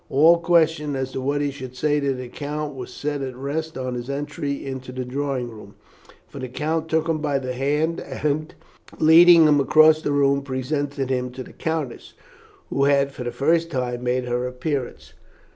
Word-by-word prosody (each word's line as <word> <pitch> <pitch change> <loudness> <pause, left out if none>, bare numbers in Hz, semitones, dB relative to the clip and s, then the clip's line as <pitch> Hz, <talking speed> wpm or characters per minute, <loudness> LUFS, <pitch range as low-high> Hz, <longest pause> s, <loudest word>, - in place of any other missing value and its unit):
All 160 +5 +5
question 160 -3 +2
as 130 -1 -3
to 130 - -4
what 140 +2 0
he 145 -1 0
should 130 -2 -9
say 150 +2 +1
to 140 -1 0
the 125 -1 -6
count 150 +3 -5
was 130 -2 -8
set 145 -1 -3
at 130 -2 -5
rest 150 +4 -4
on 130 -1 -3
his 120 +1 -5
entry 140 0 -4
into 130 -1 -6
the 130 0 -5
drawing 130 -2 -3
room, 105 -2 -13 0.5
for 140 - -10
the 130 - -4
count 155 +5 -2
took 160 0 +1
him 160 -1 0
by 145 -2 0
the 130 -1 -4
hand, 150 +6 0
and, 155 +1 -2 0.5
leading 165 +1 +7
him 145 -1 +4
across 155 +3 +5
the 145 - -1
room, 140 -1 +2
presented 140 0 -3
him 125 -1 -1
to 130 0 -6
the - - -14
countess, 160 -6 -4 0.6
who 140 - +2
had 140 -1 +3
for 130 - -7
the 120 - -3
first 165 +5 +1
time 125 -4 -3
made 125 0 0
her 125 +1 -1
appearance. 125 +1 -4
140 Hz, 195 wpm, -23 LUFS, 130-155 Hz, 0.6 s, leading